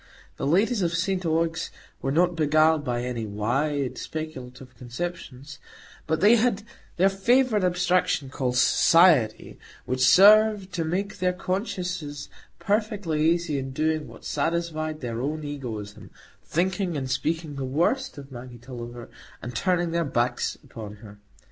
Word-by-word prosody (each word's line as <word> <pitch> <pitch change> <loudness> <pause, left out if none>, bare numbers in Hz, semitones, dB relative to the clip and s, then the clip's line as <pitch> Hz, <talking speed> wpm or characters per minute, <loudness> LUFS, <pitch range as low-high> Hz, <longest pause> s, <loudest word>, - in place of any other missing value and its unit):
The 135 - -2
ladies 200 - +2
of 170 -2 0
St 185 +2 -1
Ogg's 165 +1 0 0.3
were 135 - -1
not 175 +4 +2
beguiled 155 0 +3
by 120 -3 -2
any 120 -3 -3
wide 130 +7 -1
speculative 130 -5 -7
conceptions; 135 0 -7 0.5
but 160 0 0
they 215 +4 +6
had 220 -3 +1 0.3
their 185 +3 +5
favourite 215 +3 +2
abstraction, 180 -6 +1
called 125 -3 -1
Society, 150 -4 +4 0.3
which 130 +1 -2
served 205 +3 +6
to 170 -4 -1
make 185 +5 -3
their 180 0 +1
consciences 180 -6 -4 0.3
perfectly 200 -7 0
easy 170 -4 0
in 135 0 -6
doing 155 +1 -1
what - - -14
satisfied 155 0 -2
their 120 -2 -4
own 150 +3 -3
egoism,—thinking 145 - -4
and 135 -2 -3
speaking 160 +3 -2
the 135 -1 -5
worst 170 - 0
of 140 -1 -10
Maggie 120 -1 -9
Tulliver, 120 -1 -9 0.3
and 125 -1 -8
turning 175 - +1
their 170 0 +1
backs 120 -4 -1
upon 105 -3 -9
her. 105 0 -13
155 Hz, 135 wpm, -25 LUFS, 130-180 Hz, 0.5 s, they